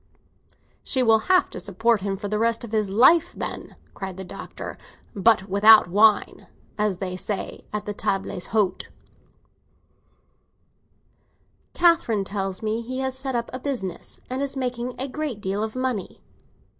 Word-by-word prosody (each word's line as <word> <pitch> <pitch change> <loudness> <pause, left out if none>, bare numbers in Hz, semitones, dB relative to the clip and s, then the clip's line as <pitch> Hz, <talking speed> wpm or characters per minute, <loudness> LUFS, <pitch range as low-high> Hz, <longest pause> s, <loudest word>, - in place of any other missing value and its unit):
"She 260 -1 +1
will 225 -2 +5
have 370 0 +5
to - - -5
support 210 +2 +1
him 195 0 -2
for 205 +1 -5
the 210 +1 -1
rest 230 +1 +1
of 235 - -8
his 215 -3 0
life, 310 - +5
then!" - - -5 0.2
cried 190 -2 -6
the 190 - -6
Doctor. 180 - -8 0.4
"But 200 -1 +3
without 210 +1 +7
wine, 210 +2 +3 0.3
as 210 -3 0
they 185 -1 -4
say 195 +1 -5
at 210 0 -4
the 210 - -3
tables 195 -2 -2
d'hôte." 200 -4 0 2.9
"Catherine 335 - +3
tells 195 0 -3
me 220 +1 -1
he 255 +3 -5
has 265 -1 -1
set 265 -1 -3
up 235 0 -2
a 255 - -4
business, 245 -10 -4
and 255 +2 -3
is 275 -1 -2
making 250 -1 -3
a 265 - -2
great 285 -4 -4
deal 195 +1 -2
of 220 +1 -3
money." 255 -6 -3
220 Hz, 155 wpm, -24 LUFS, 195-255 Hz, 2.9 s, without